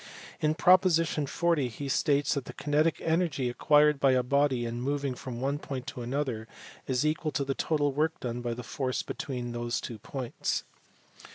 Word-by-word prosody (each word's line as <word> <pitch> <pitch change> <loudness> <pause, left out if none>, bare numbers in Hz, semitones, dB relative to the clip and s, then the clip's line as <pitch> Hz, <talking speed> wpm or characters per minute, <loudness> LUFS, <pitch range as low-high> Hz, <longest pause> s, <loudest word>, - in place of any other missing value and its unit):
In 155 0 +1
proposition 165 -4 +4
40 165 -3 +1
he 130 +4 -6
states 140 +1 +2
that 140 -3 -3
the - - -8
kinetic 150 +2 +1
energy 160 -6 +1
acquired 150 +3 +4
by 135 -1 +4
a 130 -1 +3
body 135 -1 +2
in 120 +1 -4
moving 140 0 -1
from 125 -1 -7
one 140 +3 -1
point 135 -4 -5
to 135 -2 -6
another 125 -2 -2
point - - -17
is 130 +2 +1
equal 155 +1 0
to 140 - 0
the 135 - 0
total 145 0 +1
work 155 +5 0
done 120 -1 -4
by 120 -1 -2
the 125 - -7
force 130 +1 -2
between 125 -3 -4
those 120 0 -2
two 115 -3 -7
points. 130 +2 -3
140 Hz, 185 wpm, -29 LUFS, 125-150 Hz, -, proposition